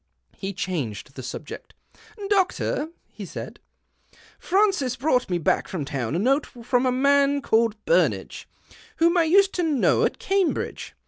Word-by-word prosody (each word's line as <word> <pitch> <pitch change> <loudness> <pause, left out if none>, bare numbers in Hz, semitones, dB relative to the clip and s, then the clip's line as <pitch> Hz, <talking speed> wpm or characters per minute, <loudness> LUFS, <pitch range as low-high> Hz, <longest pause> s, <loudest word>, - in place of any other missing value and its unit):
He 195 0 -5
changed 140 - -4
the 130 - -8
subject. 130 +4 -8 0.3
" 430 -2 -10
Doctor," 370 -5 +1 0.2
he - - -11
said, - - -8 0.4
" - - -28
Francis 380 - +1
brought 255 -3 +1
me 175 - +1
back 165 - 0
from 165 -7 -4
town 135 -1 -3
a - - +1
note 270 +9 +1
from 245 +1 -1
a - - +2
man 280 +2 +3
called 225 -4 +2
Burnage, - - 0 0.5
whom 335 +2 +3
I 340 -2 +4
used 390 +4 +4
to 360 - -1
know 305 -6 +2
at - - 0
Cambridge. 390 -3 -1
270 Hz, 155 wpm, -24 LUFS, -, 0.5 s, I